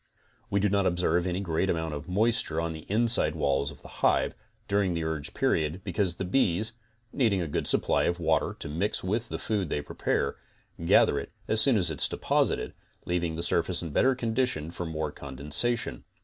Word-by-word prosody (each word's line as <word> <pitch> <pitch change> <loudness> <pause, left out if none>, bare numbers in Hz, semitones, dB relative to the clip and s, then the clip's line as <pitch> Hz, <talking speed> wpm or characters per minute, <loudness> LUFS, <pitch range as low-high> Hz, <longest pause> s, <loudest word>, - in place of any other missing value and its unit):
We 100 - +1
do 105 - +2
not 100 -1 +2
observe 90 0 +1
any 90 +2 -1
great 90 0 0
amount 80 -2 -1
of 75 +4 -7
moisture 100 -4 +2
on 85 0 -2
the 80 -1 -11
inside 110 -7 +2
walls 70 -2 +1
of 70 - -13
the - - -10
hive, - - +3 0.3
during 100 -3 +1
the 85 - -1
urge 80 -3 -4
period, 80 +4 0
because 90 -1 -1
the 95 - -4
bees, 105 0 +2 0.4
needing 110 -8 +2
a 85 - -2
good 75 - -2
supply - - +2
of 85 +1 0
water 80 -1 +1
to - - -4
mix 85 +8 -2
with 110 +5 -1
the - - -3
food 100 -6 -2
they 75 - -2
prepare, 70 -1 -1 0.5
gather 85 - +4
it - - -8 0.2
as 110 0 +3
soon 130 -5 +4
as 90 -4 +1 0.2
deposited, - - 0 0.3
leaving 85 -2 -1
the 85 - -3
surface 85 0 +1
in 85 - -5
better 130 - +3
condition 115 -9 -1
for 90 0 -5
more 80 -2 -3
condensation. 70 - -1
85 Hz, 190 wpm, -28 LUFS, 80-100 Hz, 0.5 s, gather